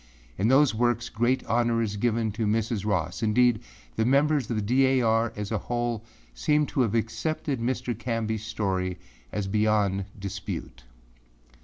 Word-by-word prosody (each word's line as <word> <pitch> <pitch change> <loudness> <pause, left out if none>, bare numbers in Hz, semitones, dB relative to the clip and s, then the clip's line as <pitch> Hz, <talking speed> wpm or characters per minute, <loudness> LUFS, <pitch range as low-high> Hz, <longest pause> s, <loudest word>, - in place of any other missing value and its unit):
In 100 - +1
those 135 +2 +5
works 120 +1 0
great 120 +4 0
honor 120 0 +1
is 110 -3 -1
given 115 0 0
Mrs. 110 0 -1
Ross, 100 -1 -1
indeed, 115 +1 +3 0.4
the - - +2
members 140 +1 +2
of 120 - -1
the 110 - 0
D. 130 +5 +3
A. 130 -1 +3
R. 115 0 +2
as 105 0 -5
a 110 - 0
whole, 120 -2 -2 0.3
seem 150 - +2
to 135 - +2
have 115 -3 +1
accepted 140 +5 -1
Mr. 125 +1 -1
Canbyâs 115 -2 -2
story 95 -4 -2 0.3
as 105 -2 -2
beyond 105 -2 +1
dispute. 95 -10 -6
115 Hz, 155 wpm, -27 LUFS, 105-120 Hz, 0.4 s, those